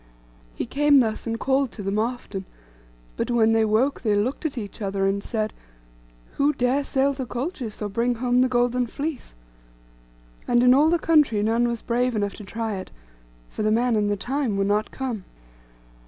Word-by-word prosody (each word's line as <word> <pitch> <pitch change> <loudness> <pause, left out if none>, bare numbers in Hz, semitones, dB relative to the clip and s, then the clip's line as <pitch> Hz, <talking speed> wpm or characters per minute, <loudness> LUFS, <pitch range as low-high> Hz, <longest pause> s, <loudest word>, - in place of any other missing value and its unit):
He - - -3
came 285 +3 +4
thus, 225 -2 -1
and 230 0 -2
called 270 +1 +1
to 205 - -7
them 195 +2 -1
often; 225 -4 -3 0.7
but - - -2
when 225 -2 +3
they 225 0 +3
woke 220 +6 +1
they 215 -4 +1
looked 250 +9 0
at 285 - -9
each 210 -1 -6
other, 195 -1 -1
and 200 +1 0
said, 215 -2 -2 0.8
'Who 285 +2 +3
dare 265 +2 +1
sail 275 0 +1
to 265 -1 -4
Colchis, 245 - -4
or - - -1
bring 235 +4 0
home 245 +1 +1
the 255 - +3
golden 245 0 +1
fleece?' 285 - -5 1.1
And 240 0 +3
in 250 0 +7
all 295 +4 +5
the 345 - +3
country 300 -11 +3
none 230 +2 +2
was 235 -1 -3
brave 245 0 0
enough 205 -1 -1
to 210 - -9
try 220 +1 -4
it; 185 - -7 0.6
for - - -6
the 215 - +2
man 235 +2 +2
and 210 -1 +1
the 205 - 0
time 250 0 -1
were 195 - +2
not 205 +2 0
come. 245 -7 -4
235 Hz, 190 wpm, -24 LUFS, 215-265 Hz, 1.1 s, in